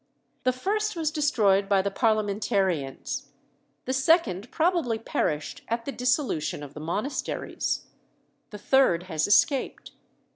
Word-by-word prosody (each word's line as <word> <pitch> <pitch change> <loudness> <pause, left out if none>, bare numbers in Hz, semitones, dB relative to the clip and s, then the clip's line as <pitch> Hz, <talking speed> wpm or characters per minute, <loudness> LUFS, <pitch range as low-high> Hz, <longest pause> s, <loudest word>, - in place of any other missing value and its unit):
The 255 - +4
first 420 +11 -1
was 320 -2 -1
destroyed 210 - +2
by 195 -2 +3
the 200 - -1
Parliamentarians; 200 - 0 0.6
the 260 - -1
second 265 - +2
probably 325 -9 +1
perished 155 -8 -2
at 230 0 -2
the 280 - -3
dissolution 250 - -1
of 145 -1 -10
the 150 - -8
monasteries; 210 - -3 0.6
the 210 - -8
third 210 -7 +3
has 160 -4 -1
escaped. 275 +6 +2
225 Hz, 120 wpm, -26 LUFS, 190-280 Hz, 0.6 s, The